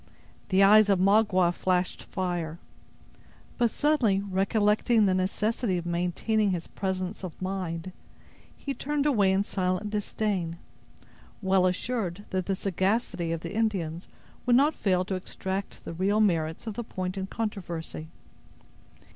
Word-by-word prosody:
The 195 0 +5
eyes 210 +1 +7
of 195 - +4
Magua 195 -3 +4
flashed 180 0 0
fire; 175 -4 -3 1.0
but 240 -1 +4
suddenly 255 -9 +2
recollecting 210 +3 +2
the 190 - +3
necessity 195 +2 0
of 175 - -4
maintaining 180 +5 0
his 175 -3 -2
presence 190 0 -4
of 180 -4 -7
mind, 185 -2 -3 0.7
he 280 - -4
turned 295 +1 -1
away 210 -10 +4
in 190 +1 +2
silent 185 +1 -1
disdain, 205 -5 -2 0.8
well 190 -2 +3
assured 200 0 -2
that 185 -1 -1
the 195 - +1
sagacity 190 -2 -1
of 165 -1 -2
the 170 +3 -6
Indians 190 -7 -1 0.4
would 245 - +5
not 290 +5 +5
fail 185 -6 +1
to 190 - -3
extract 190 +1 -4
the - - -5
real 195 +5 +1
merits 165 -5 +1
of 220 - -4
the 240 - -4
point 185 -4 -4
in 190 -1 -3
controversy. 175 - -4
190 Hz, 140 wpm, -28 LUFS, 180-215 Hz, 1.0 s, eyes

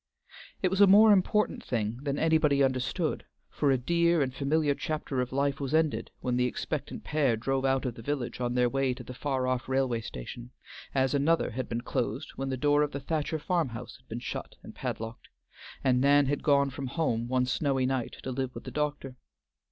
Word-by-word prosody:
It 185 - +2
was 190 +1 +2
a 200 - +9
more 210 +3 +8
important 210 +2 +2
thing 115 -1 -2
than 140 -1 -2
anybody 155 -3 +3
understood, 135 +5 0 0.3
for 145 - +1
a 135 - +4
dear 170 +5 +2
and 130 -1 -3
familiar 145 +2 +1
chapter 145 -3 -2
of 125 - -3
life 140 +1 0
was 140 +1 -1
ended 160 -2 +1
when 125 -1 0
the 125 0 +3
expectant - - -4
pair 140 -7 +1
drove 135 +3 -1
out 135 0 +1
of 125 - -2
the 115 - -10
village 130 -1 -3
on 120 0 -1
their 125 0 +4
way 135 0 0
to 125 - -9
the 125 - -8
far 130 0 -1
off 130 0 -1
railway 130 -3 +1
station, 115 - -8 0.5
as 130 -1 +2
another 150 +4 +2
had 130 +2 -4
been 115 0 -2
closed 120 +3 -3
when 135 0 -3
the 130 - -2
door 145 +2 +3
of 150 -1 0
the 140 - -3
Thacher 155 +2 -2
farm 165 -1 0
house 115 +1 -8
had 130 - -29
been 115 - -4
shut 120 - -6
and - - -10
padlocked, 115 +1 -5 0.5
and 125 -1 +3
Nan 140 +1 +5
had 140 +1 -1
gone 140 -2 +3
home 130 -3 -2
one 125 0 +1
snowy 135 0 0
night 130 -2 -2
to 130 - -3
live 130 0 -3
with - - -7
the - - -7
doctor. 145 -3 -3
135 Hz, 205 wpm, -29 LUFS, 125-150 Hz, 0.5 s, a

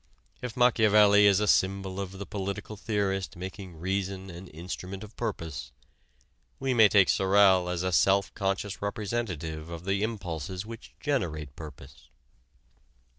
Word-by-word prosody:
If 125 -2 -6
Machiavelli 105 -4 +6
is 100 -1 +5
a 105 - +1
symbol 95 0 +1
of 95 -1 -4
the 100 +1 -7
political 100 +2 -5
theorist 100 -2 -2
making 95 -1 -8
reason 95 +1 -3
an 85 +2 -10
instrument 90 +4 -7
of 110 +1 -12
purpose, 70 -7 -4 0.9
we 135 -1 0
may 110 -3 +7
take 100 -3 +5
Sorel 95 -2 +4
as 90 0 -2
a 95 - 0
self 95 +2 +3
conscious 95 0 -2
representative 95 -7 -3
of 85 +1 -7
the 100 +1 0
impulses 95 -4 -4
which 115 +1 -10
generate 80 - -2
purpose. 75 -5 -12
95 Hz, 135 wpm, -28 LUFS, 90-105 Hz, 0.9 s, may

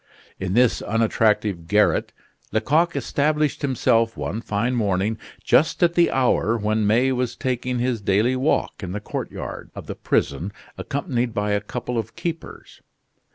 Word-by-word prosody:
In 95 +1 -2
this 125 -1 +3
unattractive 105 -5 +1
garret 105 +3 +2 0.4
Lecoq 155 +10 +2
established 150 0 0
himself 115 -4 +1
one 110 - -3
fine 110 +3 -1
morning, 105 -1 0 0.2
just 160 +3 +3
at 170 -1 +4
the 175 -1 +4
hour 120 -3 +2
when 110 0 0
May 120 +5 +3
was 125 -2 -1
taking 125 -1 -2
his 120 -2 -1
daily 105 +6 +2
walk 130 -3 0
in 90 -2 -5
the 105 - -3
courtyard 105 - -6
of - - -8
the - - -5
prison 85 +9 -1 0.2
accompanied 125 -5 -2
by 105 0 0
a 105 0 +1
couple 120 +2 -4
of 115 0 -6
keepers. 165 -1 -6
115 Hz, 150 wpm, -23 LUFS, 105-130 Hz, 0.4 s, at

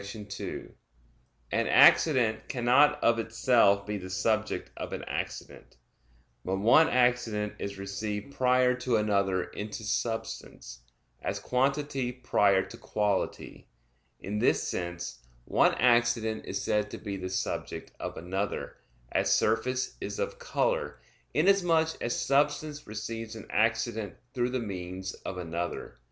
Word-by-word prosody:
2: 100 0 -7 0.8
An - - +1
accident 115 -8 +5
cannot 135 +4 +4
of 115 0 +4
itself 115 -3 +3
be 105 -1 -3
the 95 0 -8
subject 110 +3 -1
of - - -6
an - - -4
accident; - - -6 0.7
but 95 - -1
one 120 +11 +5
accident 125 -4 +1
is 100 0 -5
received 105 +5 -4
prior 125 -1 +3
to 125 -1 -1
another 100 -3 +1
into 105 +4 -7
substance, 110 - -4 0.4
as - - -2
quantity 135 0 0
prior 100 -6 +2
to - - -11
quality. 105 -2 -2 0.5
In 105 +2 -3
this - - +2
sense 85 -6 -4 0.3
one - - +3
accident 120 -2 +2
is 95 - -2
said 105 0 0
to - - -7
be 100 -3 -5
the 95 -1 -5
subject 95 - -3
of - - -5
another; 95 +4 -3 0.3
as - - +1
surface 125 +4 +1
is - - -4
of 485 0 -3
color, - - -1 0.4
inasmuch 175 -5 +4
as 120 - -1
substance 145 +1 0
receives 110 +1 -5
an 110 - -9
accident 110 -1 0 0.2
through 120 -1 0
the 130 0 -1
means 95 -3 -5
of 95 - -7
another. 85 -7 -4
110 Hz, 130 wpm, -29 LUFS, 100-125 Hz, 0.8 s, accident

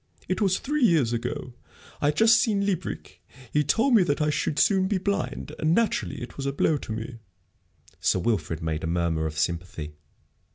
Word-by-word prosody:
It 185 - -1
was 190 -3 +3
three 295 0 -1
years 155 - +3
ago. 120 +1 -4 0.5
I 145 - +2
had 150 - +1
just 225 +1 +6
seen 205 -3 +1
Liebreich. 190 -3 -4 0.3
He 150 - +3
told 230 - +2
me 220 - +7
that 145 -4 0
I 150 0 +2
should 150 0 -1
soon 190 -2 +3
be 200 0 +1
blind, 200 +2 -2
and, 155 +2 +2
naturally, 230 - 0
it 120 - -10
was 140 -1 -3
a - - +1
blow 150 +2 +1
to 120 - -8
me." 115 +2 -5 0.8
Sir - - +2
Wilfrid 90 -5 -1
made 80 -1 -2
a - - -1
murmur 85 -2 0
of 75 0 -7
sympathy. 80 -1 -3
145 Hz, 195 wpm, -26 LUFS, -, 0.8 s, me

